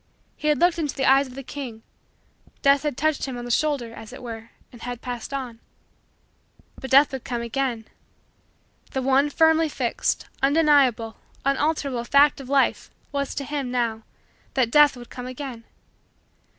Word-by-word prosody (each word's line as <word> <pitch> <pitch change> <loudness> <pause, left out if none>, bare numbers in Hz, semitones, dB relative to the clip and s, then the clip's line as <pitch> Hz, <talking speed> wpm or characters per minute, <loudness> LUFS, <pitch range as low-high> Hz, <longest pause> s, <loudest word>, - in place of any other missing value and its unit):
He 305 - -4
had 300 -1 +3
looked 345 -1 +3
into 300 -4 -2
the 270 - 0
eyes 270 +1 +5
of 255 - -12
the 275 - -7
King. 245 -5 -7 0.8
Death 280 0 +5
had 295 -4 -3
touched 310 0 0
him 260 -3 -5
on 240 - -6
the 245 - -4
shoulder, 275 -4 0
as 220 0 -10
it 255 - -10
were, 225 -1 -7 0.2
and 240 - -14
had 245 -1 -5
passed 245 +1 -6
on. 255 -4 -5 1.2
But 265 - -7
Death 275 +3 +6
would 265 -2 -5
come 240 -2 -3
again. 235 -1 -2 1.1
The 265 - -1
one 270 +2 +3
firmly 320 +1 +3
fixed, - - -1 0.2
undeniable, 275 -6 +3 0.3
unalterable, 275 -3 0
fact 280 +3 +4
in 265 - -10
Life 275 0 +1 0.2
was, 280 -1 -2
to 280 - -3
him, 280 -2 -3
now, 235 -3 -1 0.5
that 250 -4 +2
Death 295 -2 +6
would 240 -1 -12
come 250 0 -7
again. 255 -3 -7
265 Hz, 165 wpm, -24 LUFS, 240-285 Hz, 1.2 s, Death